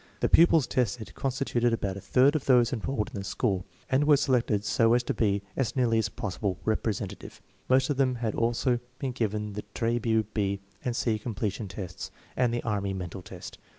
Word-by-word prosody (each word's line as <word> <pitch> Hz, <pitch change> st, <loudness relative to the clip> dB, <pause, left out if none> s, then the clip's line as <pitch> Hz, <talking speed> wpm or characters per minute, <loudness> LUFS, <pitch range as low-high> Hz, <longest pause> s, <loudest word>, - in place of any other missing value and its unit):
The -, -, +2 dB
pupils 165 Hz, -4 st, +6 dB
tested 120 Hz, -3 st, -1 dB
constituted 125 Hz, -3 st, 0 dB
about 100 Hz, -4 st, -1 dB
a 100 Hz, -, -7 dB
third 135 Hz, +8 st, +4 dB
of 150 Hz, -, -1 dB
those 125 Hz, -1 st, +4 dB
enrolled 110 Hz, -1 st, -2 dB
in -, -, -4 dB
the -, -, -5 dB
school, 95 Hz, -1 st, -1 dB, 0.2 s
and 140 Hz, +2 st, +2 dB
were 150 Hz, -1 st, +6 dB
selected 120 Hz, -7 st, +1 dB
so 115 Hz, +2 st, +3 dB
as 125 Hz, -, +2 dB
to -, -, -1 dB
be 100 Hz, -3 st, +1 dB
as 135 Hz, -1 st, -1 dB
nearly 120 Hz, -3 st, +3 dB
as 110 Hz, -, 0 dB
possible 100 Hz, -4 st, -3 dB
representative. 110 Hz, -2 st, -2 dB, 0.3 s
Most 130 Hz, +2 st, +4 dB
of 140 Hz, -, -1 dB
them 130 Hz, -2 st, +2 dB
had 115 Hz, -3 st, -2 dB
also 120 Hz, +1 st, +1 dB, 0.2 s
been 135 Hz, -2 st, -2 dB
given 105 Hz, -4 st, -2 dB
the 105 Hz, -, -5 dB
Trabue 115 Hz, -1 st, +1 dB
B 100 Hz, -2 st, 0 dB, 0.2 s
and 125 Hz, -2 st, -1 dB
C 110 Hz, -3 st, 0 dB
Completion 110 Hz, -1 st, -3 dB
Tests 95 Hz, -1 st, -7 dB, 0.3 s
and 125 Hz, -2 st, +2 dB
the 120 Hz, -, -2 dB
Army 100 Hz, -3 st, -1 dB
mental 90 Hz, 0 st, -6 dB
test. -, -, -10 dB
115 Hz, 190 wpm, -28 LUFS, 100-125 Hz, 0.3 s, pupils